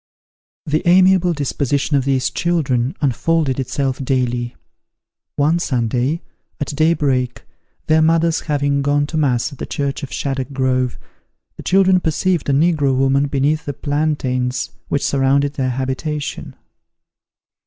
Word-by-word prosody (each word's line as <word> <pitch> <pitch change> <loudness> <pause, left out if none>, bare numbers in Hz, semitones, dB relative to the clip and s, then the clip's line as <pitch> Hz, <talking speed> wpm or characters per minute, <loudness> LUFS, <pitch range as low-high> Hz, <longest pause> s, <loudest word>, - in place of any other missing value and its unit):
The 155 +1 0
amiable 185 0 +5
disposition 140 0 -1
of 135 -2 +1
these 135 -2 +1
children 145 -5 0
unfolded 145 0 +1
itself 135 +1 -2
daily. 125 -2 -1 0.8
One 155 +4 +2
Sunday, 125 +2 -1 0.4
at 145 - -3
day 160 +3 +3
break, 130 -5 -1 0.4
their 160 0 +3
mothers 165 +1 +2
having 145 -2 0
gone 145 +1 +1
to 155 +2 -4
mass 130 -6 +1
at 140 - -12
the - - -5
church 140 -1 -3
of 140 - -7
Shaddock 135 -1 -3
Grove, 130 -2 0 0.6
the - - -9
children 190 -1 +4
perceived 175 -1 0
a - - +4
negro 145 -2 +2
woman 135 +1 +2
beneath 140 +3 0
the 145 - -3
plantains 135 -4 -1 0.2
which 145 - -1
surrounded 140 +1 +2
their 130 -3 -1
habitation. 135 +4 -4
140 Hz, 130 wpm, -19 LUFS, 130-155 Hz, 0.8 s, amiable